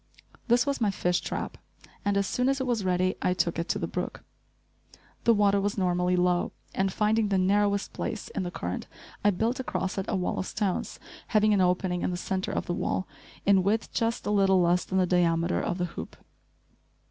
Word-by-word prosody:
This 245 +2 +4
was 280 -3 -1
my 215 - +3
fish 180 -2 0
trap, - - -4 0.4
and 205 0 +1
as 200 - +2
soon 250 +6 +1
as 275 0 +1
it 265 - -1
was 235 -5 0
ready 185 0 +1
I 180 - +1
took 170 -2 0
it 170 - -3
to - - +1
the - - -2
brook. - - -4 1.0
The 235 - +6
water 200 -1 +3
was 205 +1 -1
normally 180 -1 +1
low 180 0 +1 0.2
and, 195 0 0
finding 215 +2 +2
the 195 - +2
narrowest 200 +2 +2
place 215 -2 -4
in - - -3
the 180 - -2
current, 90 - -4 0.4
I 205 - +5
built 225 +6 0
across 195 -6 -2
it 190 - -4
a - - 0
wall 180 -1 -1
of 185 - -3
stones, 200 -4 -2 0.3
having 215 -1 +3
an 200 - +3
opening 180 0 +1
in - - 0
the 180 - -2
centre 190 +1 -2
of - - -2
the 175 - -2
wall, 185 - -1 0.4
in 195 -1 +5
width 210 +4 0
just 230 0 -1
a - - 0
little 195 -2 +4
less 175 0 +2
than 190 - -2
the 185 - +4
diameter 170 -1 +2
of 175 - -2
the 180 - 0
hoop. 175 - -8
190 Hz, 210 wpm, -28 LUFS, 180-210 Hz, 1.0 s, The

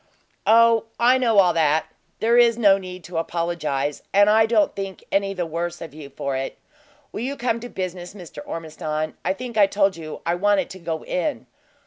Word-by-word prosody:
"Oh, 230 0 +5
I 250 +2 +5
know 230 -4 +2
all 180 -3 +6
that. 160 -1 +2 0.4
There 230 +2 +3
is 235 -1 +5
no 200 -4 +5
need 185 -1 -9
to 175 -2 -4
apologize, 165 -4 -2
and 205 +1 +5
I 220 +1 +5
don't 220 -2 +2
think 195 -1 -6
any 195 0 0
the 180 -2 -2
worse 170 +2 -4
of 160 -4 -9
you 150 -2 -10
for 140 0 -4
it. 135 0 -4 0.5
Will - - -6
you 275 +4 -3
come 235 -1 -1
to 245 +1 -8
business, 185 -1 -5
Mr. 170 -6 -10
Ormiston? 155 -1 -4
I 185 - +1
think 240 +1 -7
I 200 - +7
told 195 -1 +1
you 155 -2 -8
I 170 - +1
wanted 195 +1 +1
to 185 - -9
go 165 -2 -4
in. 280 +11 -2
185 Hz, 195 wpm, -23 LUFS, 165-220 Hz, 0.5 s, I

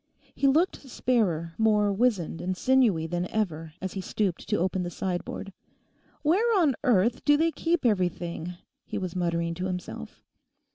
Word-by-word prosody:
He 275 - +1
looked 320 +7 +2
sparer, 185 -11 0
more 210 -2 +3
wizened 200 -7 0
and 185 +1 -2
sinewy 240 -11 +3
than 175 +2 -2
ever 165 -7 -2
as 190 0 -4
he 195 - -3
stooped 190 -1 -2
to 210 - +2
open 185 +1 0
the 175 - -2
sideboard. 185 +2 -4 0.7
'Where 405 +8 +3
on 305 -6 +4
earth 235 -1 +2
do 290 0 +5
they 330 +2 +2
keep 335 -2 0
everything?' 175 -4 -1 0.3
he - - -5
was 185 -2 -4
muttering 170 -1 0
to 180 +2 -4
himself. 180 - -6
190 Hz, 155 wpm, -27 LUFS, 175-250 Hz, 0.7 s, do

